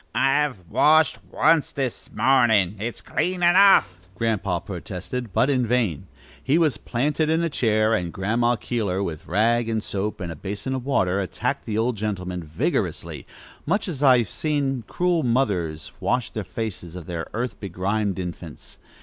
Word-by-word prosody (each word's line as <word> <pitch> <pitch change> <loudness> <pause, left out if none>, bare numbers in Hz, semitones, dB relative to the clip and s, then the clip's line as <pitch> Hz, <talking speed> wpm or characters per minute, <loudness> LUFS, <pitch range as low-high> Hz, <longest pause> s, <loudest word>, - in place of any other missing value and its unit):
"I've 135 - +1
washed 155 - +4
once 165 -3 +3
this 135 -4 -4
mornin'. 110 -8 +3
It's 115 +3 -4
clean 180 0 -1
enough," 175 - +5
Grandpa 100 -4 0
protested, 95 - -6
but 125 - +2
in 130 -4 +1
vain. 110 - 0 0.4
He 145 - +2
was 160 -5 +2
planted 150 +5 0
in 160 +1 +2
a 165 - -1
chair, 110 -3 +2
and 90 -5 -1
Grandma 115 +6 +1
Keeler, 105 -6 -2
with 80 -5 -5
rag 115 +5 +2
and 110 -1 -1
soap 105 +2 -3
and 90 -3 -4
a - - -6
basin 100 - -4
of 130 0 -4
water, 95 -8 +1
attacked 95 - -3
the 110 -1 -2
old 115 +1 0
gentleman 90 -4 -3
vigorously, 80 0 -2 0.4
much 200 +7 +1
as 150 -7 -5
I 130 -3 +7
have 115 -6 0
seen 140 -6 -1
cruel 175 -2 +1
mothers 100 - 0
wash 125 -2 0
the 110 - -4
faces 95 -4 -6
of 90 -3 -7
their 85 -1 -4
earth 120 0 -3
begrimed 100 +1 -2
infants. 85 -3 -8
110 Hz, 160 wpm, -24 LUFS, 95-135 Hz, 0.4 s, I